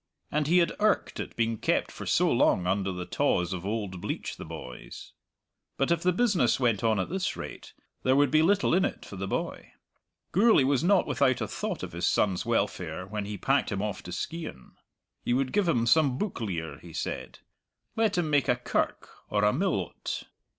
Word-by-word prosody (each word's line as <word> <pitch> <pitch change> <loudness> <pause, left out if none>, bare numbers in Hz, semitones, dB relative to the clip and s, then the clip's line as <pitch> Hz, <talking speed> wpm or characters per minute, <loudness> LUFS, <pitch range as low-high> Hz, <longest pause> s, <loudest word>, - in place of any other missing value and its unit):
and 150 0 0
he 175 +3 +4
had 170 -1 +4
irked 215 0 +1
at - - -5
being 115 -1 0
kept - - +1
for - - -8
so - - +3
long 90 - +3
under 95 +1 0
the 90 -1 -5
tawse 90 +1 +1
of 90 -2 -5
old 100 -4 -3
Bleach - - -4
the - - -8
boys. 60 -1 -9 0.6
But 135 - +1
if 170 -1 +2
the 180 - +3
business 185 - +2
went 120 -5 +1
on 110 -3 +2
at 95 - -1
this 185 +1 -2
rate - - -8 0.3
there 130 +1 +3
would 140 -1 +4
be 155 - +5
little 200 +3 +3
in 185 +2 +4
it - - -3
for - - -9
the 95 0 -4
boy. - - -4 0.6
Gourlay 215 - +5
was 135 +2 +2
not 190 +1 +4
without 130 -3 +2
a - - -2
thought - - -4
of - - -5
his 85 +1 -1
son's 95 -3 +1
welfare 90 - -1
when 105 +1 -4
he 105 0 -5
packed 135 +8 +1
him 100 -1 -1
off 105 -2 -3
to 90 - -9
Skeighan. 155 - -6 0.5
He 120 - +1
would 130 0 0
give 205 -3 +2
him 120 -9 +2
some 135 0 +4
book 205 - -3
lear, 80 -8 -4
he 85 -2 -12
said; - - -4 0.6
let 220 -4 +1
him 175 -3 +1
make 145 -2 +3
a 125 - +5
kirk 120 - -1 0.2
or 105 0 +1
a 105 - +4
mill 175 - +1
o't. 90 - -5
125 Hz, 205 wpm, -28 LUFS, -, 0.6 s, be